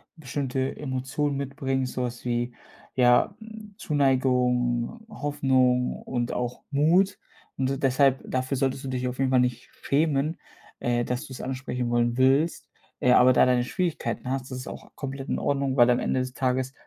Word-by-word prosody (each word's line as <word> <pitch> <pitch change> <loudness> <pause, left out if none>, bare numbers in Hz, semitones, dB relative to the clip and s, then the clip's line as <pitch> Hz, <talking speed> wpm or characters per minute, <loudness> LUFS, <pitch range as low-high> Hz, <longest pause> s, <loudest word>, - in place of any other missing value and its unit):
bestimmte 135 -2 -3
Emotionen 140 +1 -2
mitbringst, 135 -1 -2
sowas 125 -1 -4
wie, 120 0 -1 0.4
ja, 125 +8 +4
hm, 220 -2 -11
Zuneigung, 125 - +1
Hoffnung 130 - +1
und 120 -2 -2
auch 125 0 -3
Mut 175 +8 +3 0.4
und 130 0 0
d 135 - -1
deshalb 135 0 +3
dafür 130 +1 -1
solltest 135 0 -1
du 135 - -4
dich 125 -1 -2
auf 125 - -4
jeden 135 -1 +1
Fall 130 - +5
nicht 125 -1 -1
schämen, 150 +1 +1 0.4
äh, 120 0 0
dass 125 +4 -3
du 135 - -10
es 125 - -7
ansprechen 130 -2 -3
wollen 120 0 +1
willst. 135 +6 +2 0.3
Äh, 125 - +3
aber 130 +1 +6
da - - +5
deine 125 -1 +3
Schwierigkeiten 130 - -2
hast, 135 0 -3
das 130 - -4
ist - - -8
auch - - -9
komplett 135 0 -6
in - - 0
Ordnung, 140 -1 0
weil 120 -1 +6
am 125 - +3
Ende 130 - 0
des 130 0 -3
Tages 130 0 -1
130 Hz, 170 wpm, -26 LUFS, 125-140 Hz, 0.4 s, aber